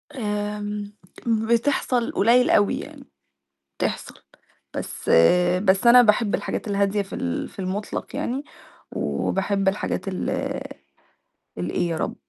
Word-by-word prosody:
آمم 210 Hz, -2 st, -3 dB, 0.4 s
بتحصل 235 Hz, +2 st, +1 dB
قليل 240 Hz, +5 st, +4 dB
أوي 205 Hz, -, +3 dB
يعني، -, -, -10 dB, 0.8 s
بتحصل -, -, -3 dB, 0.6 s
بس -, -, -6 dB, 0.6 s
بس 195 Hz, +4 st, +3 dB
أنا 245 Hz, +1 st, +9 dB
باحب 210 Hz, -1 st, +2 dB
الحاجات 220 Hz, -, -2 dB
الهادية 200 Hz, 0 st, +1 dB
في 195 Hz, -, -10 dB
ال 85 Hz, -1 st, -3 dB
في -, -, -20 dB
المطلق 195 Hz, +2 st, -4 dB
يعني، 265 Hz, +4 st, -2 dB, 0.5 s
وباحب 195 Hz, 0 st, -1 dB
الحاجات 195 Hz, 0 st, -2 dB
ال 185 Hz, -, -2 dB, 1.3 s
الإيه 95 Hz, -, -1 dB
يا 165 Hz, -, -2 dB
رب؟ -, -, -2 dB
205 Hz, 110 wpm, -23 LUFS, 195-230 Hz, 1.3 s, أنا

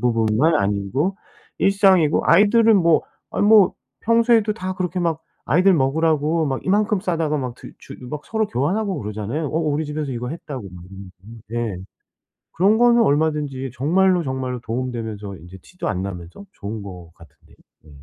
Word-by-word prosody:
부분만 115 Hz, +5 st, +2 dB
아니고 105 Hz, -, -1 dB, 0.4 s
일상이고 190 Hz, -5 st, +3 dB
아이들은 215 Hz, +5 st, +5 dB
뭐 170 Hz, -4 st, +3 dB, 0.3 s
아 -, -, -3 dB
뭐 205 Hz, -2 st, +5 dB, 0.3 s
평소에도 230 Hz, -1 st, +3 dB
다 185 Hz, -3 st, -5 dB
그렇게 180 Hz, -1 st, -3 dB
막 165 Hz, -2 st, -1 dB, 0.2 s
아이들 180 Hz, +8 st, +4 dB
먹으라고 155 Hz, +2 st, +1 dB
막 135 Hz, -2 st, -3 dB
이만큼 205 Hz, +1 st, +1 dB
싸다가 165 Hz, -5 st, -1 dB
막 125 Hz, -3 st, -4 dB
드 -, -, -12 dB
주 -, -, -12 dB
막 150 Hz, -1 st, -6 dB
서로 220 Hz, -1 st, -1 dB
교환하고 190 Hz, -, -1 dB
그러잖아요. 110 Hz, +8 st, -4 dB
"어 150 Hz, +3 st, -2 dB
우리 155 Hz, -1 st, -1 dB
집에서 150 Hz, -2 st, -4 dB
이거 125 Hz, +1 st, -4 dB
했다."고 140 Hz, -9 st, -7 dB
막 90 Hz, -1 st, -11 dB
이러고. 95 Hz, +3 st, -13 dB, 0.3 s
예. 100 Hz, -, -5 dB, 0.8 s
그런 200 Hz, +5 st, +3 dB
거는 240 Hz, 0 st, +5 dB
얼마든지 145 Hz, -, 0 dB
정말로, 180 Hz, +6 st, +2 dB
정말로 130 Hz, -2 st, -4 dB
도움 125 Hz, +3 st, -3 dB
되면서 105 Hz, -5 st, -6 dB
이제 90 Hz, +4 st, -13 dB
티도 180 Hz, -, -7 dB
안 90 Hz, -, -2 dB
나면서 90 Hz, -, -8 dB
좋은 105 Hz, +1 st, -7 dB
것 90 Hz, -4 st, -10 dB
같은데요. 80 Hz, -2 st, -20 dB, 0.3 s
예. -, -, -17 dB
150 Hz, 355 characters per minute, -21 LUFS, 115-185 Hz, 0.8 s, 아이들은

